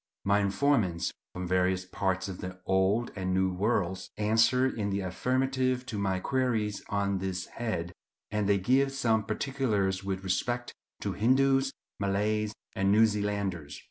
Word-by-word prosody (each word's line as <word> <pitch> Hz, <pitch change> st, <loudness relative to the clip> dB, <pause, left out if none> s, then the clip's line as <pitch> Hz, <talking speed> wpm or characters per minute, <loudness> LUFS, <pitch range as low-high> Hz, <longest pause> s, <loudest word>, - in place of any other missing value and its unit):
My 100 Hz, +1 st, +3 dB
informants, 100 Hz, -3 st, +1 dB, 0.2 s
from 90 Hz, 0 st, -5 dB
various 90 Hz, 0 st, +1 dB
parts 95 Hz, 0 st, -1 dB
of 95 Hz, -2 st, -6 dB
the 90 Hz, 0 st, -7 dB
Old 95 Hz, +5 st, +2 dB
and 95 Hz, -2 st, -1 dB
New 95 Hz, 0 st, +2 dB
Worlds, 95 Hz, -2 st, 0 dB
answer 115 Hz, +4 st, +3 dB
in 110 Hz, -6 st, -1 dB
the 100 Hz, 0 st, -1 dB
affirmative 130 Hz, +6 st, 0 dB
to 110 Hz, -5 st, -4 dB
my 95 Hz, -2 st, 0 dB
queries 115 Hz, -4 st, 0 dB
on 100 Hz, -1 st, 0 dB
this 95 Hz, -1 st, -3 dB
head, 90 Hz, -7 st, -4 dB, 0.4 s
and 105 Hz, -1 st, 0 dB
they 100 Hz, -, +5 dB
give 130 Hz, +8 st, +2 dB
some 115 Hz, -5 st, +2 dB
particulars 110 Hz, -5 st, -1 dB
with 95 Hz, -1 st, -3 dB
respect 120 Hz, +7 st, -1 dB, 0.3 s
to -, -, -2 dB
Hindoos, 135 Hz, +4 st, +3 dB, 0.3 s
Malays, 105 Hz, +2 st, 0 dB, 0.2 s
and 95 Hz, 0 st, +2 dB
New 110 Hz, +2 st, +6 dB
Zealanders. 100 Hz, -8 st, -2 dB
100 Hz, 145 wpm, -29 LUFS, 95-120 Hz, 0.4 s, New